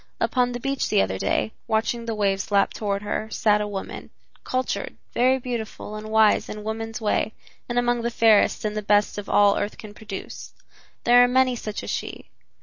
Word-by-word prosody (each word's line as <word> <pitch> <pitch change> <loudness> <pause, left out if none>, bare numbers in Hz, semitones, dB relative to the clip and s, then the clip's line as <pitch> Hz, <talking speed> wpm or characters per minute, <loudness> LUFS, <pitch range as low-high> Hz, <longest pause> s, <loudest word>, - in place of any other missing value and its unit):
Upon 250 -1 +1
the 245 - -4
beach 275 +1 -2
the - - +4
other 95 0 -3
day, 105 +2 0 0.2
watching 230 +2 0
the 225 -1 -3
waves 195 -2 0
lap 200 -1 +2
toward 200 -1 -2
her, 215 +1 -3
sat 210 -2 +2
a 210 - -2
woman, 200 -2 -6 0.3
cultured, 255 0 -3 0.2
very 255 +2 +3
beautiful 235 -4 -5
and 215 0 -7
wise 220 -1 +3
in 210 0 -6
woman's 225 +1 -4
way 215 0 0 0.4
and 240 - -2
among 240 0 +2
the 235 - -1
fairest 225 -2 +3
and 210 0 -2
the 215 - -1
best 205 0 +2
of 205 - -8
all 205 -1 +4
earth 205 - -3
can 215 -2 -10
produce. 210 -2 -8 0.5
There 245 +1 +7
are - - +5
many 255 0 +3
such 215 -2 -5
as - - -4
she. - - -5
220 Hz, 195 wpm, -24 LUFS, 205-240 Hz, 0.5 s, There